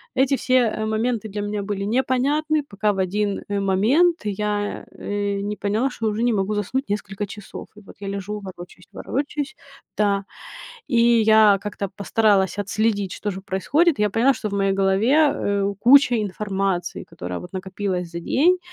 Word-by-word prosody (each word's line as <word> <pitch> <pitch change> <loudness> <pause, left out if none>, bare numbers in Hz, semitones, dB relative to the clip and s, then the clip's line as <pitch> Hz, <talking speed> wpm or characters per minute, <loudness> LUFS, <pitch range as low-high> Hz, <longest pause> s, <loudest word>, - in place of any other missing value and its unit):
эти 265 +1 +3
все, 255 0 -2
э, 225 -3 +2
моменты 220 +1 -1
для 205 +1 -4
меня 205 0 -3
были 200 0 -3 0.2
непонятны 295 +4 +1
пока 205 +1 0
в - - -7
один, 200 +2 -1
э, 205 0 -1
момент 220 - +3
я, 205 0 -2 0.2
э, 205 -1 -2
не 205 +1 -3
поняла 215 +7 0
что 230 -3 -3
уже 215 +2 -2
не 240 -1 +2
могу 200 +1 0
заснуть 230 +6 -2
несколько 205 0 -3
часов. 205 0 -9
И - - -12
вот 195 - -15
я 200 - -5
лежу 200 +1 -4
ворочаюсь, 185 -2 -11
ворочаюсь, 285 +1 -3 0.4
да. 200 -1 +1 0.6
И 240 - 0 0.2
я 215 -2 +6
как-то 200 -1 -4
постаралась 205 -2 +2
отследить 205 -1 0
что 205 - -3
же 190 0 -7
происходит. 270 - +1
Я 210 0 +2
поняла 235 +7 +3
что 215 - -4
в - - -7
моей 195 0 +2
голове, 220 +11 +3
э, 200 0 0
куча 255 +1 +6
информации, 195 -3 -2
которая, 90 0 -7
вот, 180 - -11
накопилась 185 -1 -3
за 170 - -5
день. 330 - +3
205 Hz, 170 wpm, -22 LUFS, 195-230 Hz, 0.6 s, я